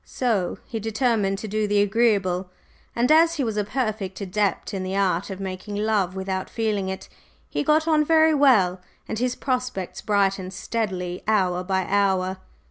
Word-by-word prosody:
So 220 Hz, -8 st, -1 dB
he 225 Hz, -, -5 dB
determined 220 Hz, -3 st, 0 dB
to 215 Hz, -, -6 dB
do 215 Hz, +1 st, -1 dB
the 205 Hz, 0 st, +2 dB
agreeable, 195 Hz, -4 st, +2 dB, 0.5 s
and 240 Hz, +4 st, +2 dB
as 330 Hz, +2 st, +5 dB
he 290 Hz, -, -1 dB
was 225 Hz, -3 st, -2 dB
a 210 Hz, -, +1 dB
perfect 210 Hz, -4 st, -3 dB
adept 200 Hz, +1 st, -1 dB
in 195 Hz, -, -2 dB
the 185 Hz, +1 st, -3 dB
art 190 Hz, -2 st, +1 dB
of 195 Hz, -1 st, -6 dB
making 190 Hz, +2 st, -5 dB
love 205 Hz, -3 st, 0 dB
without 190 Hz, 0 st, -3 dB
feeling 210 Hz, -4 st, -1 dB
it, 190 Hz, -, -6 dB, 0.4 s
he -, -, -2 dB
got 310 Hz, +2 st, +2 dB
on 310 Hz, -2 st, +4 dB
very 315 Hz, 0 st, +4 dB
well, 210 Hz, -11 st, +4 dB, 0.3 s
and 220 Hz, -, -3 dB
his 250 Hz, 0 st, 0 dB
prospects 250 Hz, -8 st, -3 dB
brightened 195 Hz, -2 st, 0 dB
steadily 185 Hz, -5 st, -3 dB
hour 185 Hz, -4 st, +2 dB
by 190 Hz, 0 st, 0 dB
hour. 190 Hz, -2 st, +1 dB
205 Hz, 170 wpm, -24 LUFS, 190-230 Hz, 0.5 s, as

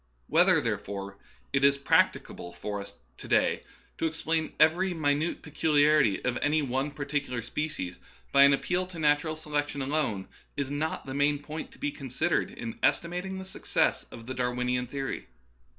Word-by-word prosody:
Whether, -, -, +4 dB
therefore, 100 Hz, 0 st, -4 dB, 0.3 s
it 135 Hz, 0 st, +2 dB
is 140 Hz, 0 st, +5 dB
practicable 85 Hz, -9 st, +1 dB
for 100 Hz, +3 st, -4 dB
us 100 Hz, -, -10 dB, 0.2 s
to -, -, -9 dB
day -, -, +2 dB, 0.4 s
to 165 Hz, -, +2 dB
explain 160 Hz, 0 st, -1 dB
every 180 Hz, +3 st, +4 dB
minute 150 Hz, +1 st, 0 dB
peculiarity 150 Hz, -6 st, +3 dB
of 125 Hz, -1 st, 0 dB
any 150 Hz, +1 st, +2 dB
one 135 Hz, +2 st, -1 dB
particular 140 Hz, -4 st, -3 dB
species 120 Hz, -, -4 dB, 0.3 s
by 140 Hz, -, +6 dB
an 140 Hz, 0 st, +8 dB
appeal 180 Hz, +6 st, 0 dB
to 185 Hz, -2 st, -10 dB
natural 155 Hz, 0 st, +2 dB
se 155 Hz, -1 st, -11 dB
lection 145 Hz, -1 st, -1 dB
alone 135 Hz, -8 st, -1 dB, 0.3 s
is 140 Hz, -1 st, -2 dB
not 155 Hz, +2 st, -2 dB
the 135 Hz, -, -5 dB
main 145 Hz, +1 st, +2 dB
point 150 Hz, +2 st, -7 dB
to -, -, -17 dB
be 145 Hz, -, -2 dB
consid 140 Hz, +5 st, -2 dB
ered -, -, +1 dB
in 115 Hz, -1 st, -6 dB
estimating 175 Hz, +7 st, 0 dB
the 190 Hz, -, -6 dB
success 190 Hz, -, 0 dB
of 115 Hz, -, -11 dB
the 130 Hz, -, -4 dB
Darwinian 125 Hz, 0 st, -1 dB
theory. 135 Hz, +1 st, -4 dB
145 Hz, 165 wpm, -29 LUFS, 125-155 Hz, 0.4 s, an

